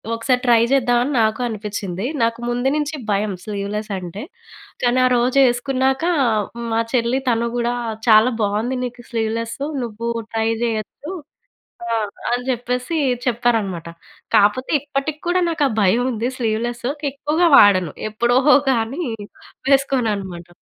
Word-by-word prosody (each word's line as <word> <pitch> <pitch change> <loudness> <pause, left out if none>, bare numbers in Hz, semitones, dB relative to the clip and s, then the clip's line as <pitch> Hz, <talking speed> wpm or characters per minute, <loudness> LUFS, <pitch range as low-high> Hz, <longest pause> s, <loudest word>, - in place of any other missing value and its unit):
ఒకసారి 250 +2 +1
ట్రై 235 -2 +5
చేద్దాం, 245 -3 +3
అని 285 - -2
నాకు 220 +2 +1
అనిపించింది. 205 -3 -4 0.2
నాకు 230 0 0
ముందు 245 +2 0
నుంచి 300 +1 -2 0.2
భయం 200 0 0
స్లీవ్‌లెసంటే. 200 -2 -4 0.6
కానీ, 245 +1 +3
ఆ - - +5
రోజు 250 +3 +1
వేసుకున్నాక 265 +3 0 0.7
మా 225 - +2
చెల్లి 240 +1 +1
తను 235 0 +1
కూడా, 240 0 0 0.3
"చాలా 220 +2 +7
బాగుంది 220 +6 -1
నీకు 245 0 -8
స్లీవ్‌లెసు. 230 +3 -2 0.2
నువ్వు 230 0 -5 0.3
ట్రై 225 0 +1
చేయొచ్చు" 230 - -4 0.8
ఆ! 230 - +1 0.3
అని 245 +1 0
చెప్పేసి 250 +4 -2 0.3
చెప్పారన్నమాట. 225 -8 0 0.5
కాపోతే 210 +6 +3
ఇప్పటికి 290 +2 -3
కూడా 360 +1 +2
నాకు 320 -3 0
ఆ - - -5
భయం 205 +5 +3
ఉంది 235 0 -2
స్లీవ్‌లెసు. 235 +2 -2 0.2
ఎక్కువగా 300 +5 +1
వాడను. 185 -6 +5 0.2
ఎప్పుడో 235 +3 +2 0.3
కానీ 250 +7 -1 0.7
వేసుకోను 270 -4 +2
అన్నమాట. 180 -3 -7
235 Hz, 130 wpm, -20 LUFS, 215-255 Hz, 0.8 s, చాలా